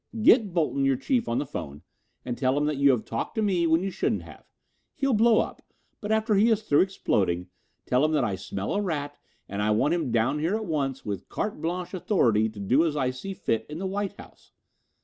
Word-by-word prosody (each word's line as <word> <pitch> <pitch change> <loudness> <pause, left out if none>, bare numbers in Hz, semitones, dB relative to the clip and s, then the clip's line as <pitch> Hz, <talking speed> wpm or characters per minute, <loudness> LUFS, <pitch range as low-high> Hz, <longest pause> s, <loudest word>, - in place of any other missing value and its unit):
"Get 220 -2 +5
Bolton, 155 -5 0
your 135 -1 +3
chief, 235 - 0
on 115 - 0
the 145 - -1
phone 75 - -7 0.4
and 120 - -3
tell 130 +1 +1
him 145 - +1
that 150 -1 -1
you 140 0 +5
have 125 -5 +2
talked 115 - -4
to 220 - 0
me 180 -5 +2
when 165 +2 +3
you 195 - -2
shouldn't - - -1
have. - - -14 0.5
He'll 275 -2 +1
blow 225 +1 +5
up, - - -6 0.4
but 210 0 -4
after 220 0 +2
he 210 +3 +4
is 220 -1 +1
through 145 -8 +4
exploding, 95 - 0 0.3
tell 125 +3 +2
him 155 - +2
that 150 -4 +2
I 105 -4 0
smell 95 +1 -4
a 205 - 0
rat 145 -6 -3 0.3
and 100 - -5
that 105 - +1
I - - +2
want 110 +9 +2
him 165 -8 -1
down 115 +6 +1
here 165 +7 0
at 220 0 -3
once 140 -6 -2
with 100 -3 -5
carte 210 -7 -3
blanche 175 +3 -3
authority 120 - +2
to 105 -1 -11
do 125 +10 +3
as 155 -3 -1
I 130 -2 +1
see 190 +10 -7
fit 110 -9 -1
in 150 - -6
the 190 - -4
White 200 +1 -2
House. - - -16
150 Hz, 235 wpm, -26 LUFS, 125-195 Hz, 0.5 s, Get